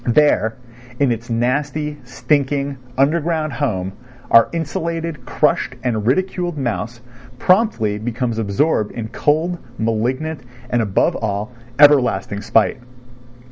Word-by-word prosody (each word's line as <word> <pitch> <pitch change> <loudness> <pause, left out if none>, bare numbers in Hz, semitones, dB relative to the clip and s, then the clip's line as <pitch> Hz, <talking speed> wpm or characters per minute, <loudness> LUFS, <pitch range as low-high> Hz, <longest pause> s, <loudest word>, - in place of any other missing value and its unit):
There 120 -4 +3 0.4
in 140 -3 +3
its 115 +1 -4
nasty, 145 +5 -1
stinking, 140 +1 0 0.2
underground 155 +2 +1
home 95 -9 -2 0.4
our 115 0 +7
insulted, 165 -3 -3
crushed - - +1
and 110 -3 -1
ridiculed 175 +3 0
mouse 120 -2 -3 0.4
promptly 155 - +2
becomes 115 0 -2
absorbed 110 +2 +1
in 110 -2 -5
cold, 165 +7 0 0.2
malignant 125 +8 -1 0.3
and, 120 - +2
above 100 -4 +1
all, 105 +1 -3 0.3
everlasting 130 -9 +4
spite. 110 +2 +2
130 Hz, 105 wpm, -19 LUFS, 115-150 Hz, 0.4 s, our